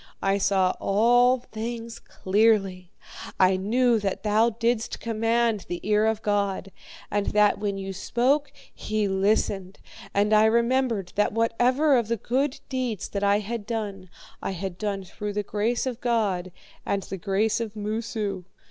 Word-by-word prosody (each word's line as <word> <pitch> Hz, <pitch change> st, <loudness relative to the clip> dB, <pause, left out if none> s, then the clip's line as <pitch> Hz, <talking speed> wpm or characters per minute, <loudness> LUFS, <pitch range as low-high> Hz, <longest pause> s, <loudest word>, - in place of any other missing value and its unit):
I 195 Hz, +1 st, +2 dB
saw 190 Hz, -2 st, +2 dB
all 245 Hz, +5 st, +4 dB
things 230 Hz, -1 st, -6 dB
clearly. 195 Hz, -3 st, +1 dB, 0.5 s
I 185 Hz, 0 st, +5 dB
knew 230 Hz, +5 st, +2 dB
that 195 Hz, -2 st, -3 dB
thou 215 Hz, +2 st, +3 dB
didst 230 Hz, 0 st, -1 dB
command 225 Hz, -1 st, 0 dB
the 175 Hz, -, -3 dB
ear 210 Hz, +1 st, +2 dB
of 220 Hz, 0 st, -1 dB
God, 200 Hz, -2 st, -1 dB, 0.4 s
and 205 Hz, 0 st, 0 dB
that 210 Hz, -1 st, +3 dB
when 205 Hz, -1 st, -2 dB
you 195 Hz, 0 st, -5 dB
spoke 260 Hz, +9 st, 0 dB, 0.2 s
he 215 Hz, -1 st, -1 dB
listened. 195 Hz, -1 st, 0 dB, 0.3 s
And 205 Hz, +2 st, +2 dB
I 215 Hz, 0 st, +6 dB
remembered 235 Hz, -3 st, +1 dB
that 210 Hz, -, +2 dB
whatever 245 Hz, +6 st, +2 dB
of 230 Hz, -, -3 dB
the 230 Hz, +1 st, -1 dB
good 260 Hz, +6 st, -1 dB
deeds 250 Hz, -6 st, -3 dB
that 200 Hz, 0 st, -3 dB
I 200 Hz, 0 st, +4 dB
had 210 Hz, 0 st, -5 dB
done, 205 Hz, -5 st, -4 dB, 0.3 s
I -, -, -3 dB
had 185 Hz, 0 st, -5 dB
done 200 Hz, -2 st, -2 dB
through 205 Hz, +3 st, -6 dB
the 210 Hz, 0 st, -1 dB
grace 215 Hz, +5 st, -1 dB
of 255 Hz, -2 st, -4 dB
God, 205 Hz, -7 st, 0 dB, 0.3 s
and 200 Hz, -1 st, -1 dB
the 195 Hz, -, -6 dB
grace 205 Hz, +4 st, 0 dB
of 220 Hz, -2 st, -5 dB
Moosu. 210 Hz, -3 st, -3 dB
215 Hz, 155 wpm, -25 LUFS, 195-230 Hz, 0.5 s, I